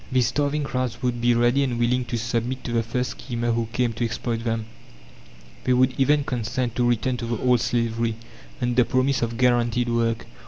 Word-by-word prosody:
These 130 -2 +3
starving 145 +2 0
crowds 130 -2 -3
would 120 -1 -1
be 120 0 +3
ready 120 +3 +3
and 125 -3 -1
willing 125 +1 +1
to 120 - -3
submit 120 +3 -2
to 120 - -4
the 115 -1 +2
first 125 +3 -2
schemer 120 -2 -3
who 115 0 0
came 120 -1 0
to 120 - -3
exploit 115 0 -2
them; 115 -2 -1 1.0
they 130 - +2
would 130 +1 +3
even 145 +2 +3
consent 125 -1 -2
to 120 -1 +3
return 125 +2 0
to 120 - -5
the 120 -1 -1
old 125 0 +2
slavery, 115 -1 0 0.4
under 125 0 +3
promise 130 +2 +1
of 115 -1 -2
guaranteed 120 -1 +2
work. 115 -1 0
120 Hz, 195 wpm, -24 LUFS, 115-125 Hz, 1.0 s, These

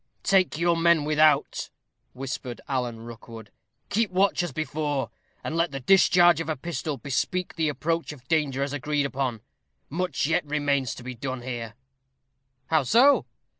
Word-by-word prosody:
"Take 185 -5 +3
your 170 +1 +2
men 165 -2 +3
without," 155 0 +2 0.4
whispered 130 -2 -5
Alan 125 -4 -2
Rookwood; 115 -1 -11 0.4
"keep 220 0 +1
watch 190 +1 +2
as 175 - -3
before, 150 -3 -2 0.3
and 155 - -3
let 170 +1 +1
the 135 - -4
discharge 175 +2 +5
of 165 - -5
a 155 - 0
pistol 155 0 -4
bespeak 145 - -2
the 160 -2 +1
approach 165 +4 -2
of 130 -4 -13
danger 145 -4 +1
as 140 0 -3
agreed 145 0 -1
upon; 130 -5 -2 0.5
much 180 +1 -1
yet 160 +4 +1
remains 145 -3 0
to 125 - -10
be 130 +1 -6
done 130 +1 -5
here." 120 -3 -5 1.0
"How 160 -1 +4
so?" 245 - +4
150 Hz, 155 wpm, -26 LUFS, 130-170 Hz, 1.0 s, discharge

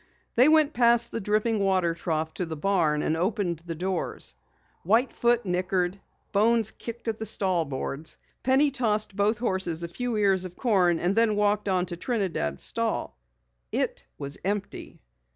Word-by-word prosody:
They 255 +5 +6
went 310 -1 +4
past 235 -1 +4
the 230 - -3
dripping 215 +2 +1
water 185 -4 +2
trough 160 -1 -2
to 180 - -3
the 160 -1 -5
barn 160 -4 +1
and 160 - +1
opened 180 -1 -1
the 165 - -3
doors. 185 +1 -3 0.5
White 225 +8 +2
Foot 240 -1 +1
nickered. 180 +1 -1 0.3
Bones 220 +1 +3
kicked 235 0 -8
at 220 -1 -2
the 220 - -3
stall 185 -4 +1
boards. 140 +2 -5 0.2
Penny 270 +3 +3
tossed 215 -6 0
both 210 +2 +2
horses 190 -7 -1
a - - -2
few 240 +6 -3
ears 195 -3 +3
of 180 -1 -7
corn 185 -8 +3
and 180 +4 0
then 225 -2 +3
walked 210 0 +1
on 185 -1 +1
to 175 -1 -6
Trinidad's 175 - -2
stall. 60 +1 -1 0.6
It - - -2
was 140 0 -5
empty. 200 +1 -4
195 Hz, 165 wpm, -27 LUFS, 175-225 Hz, 0.6 s, They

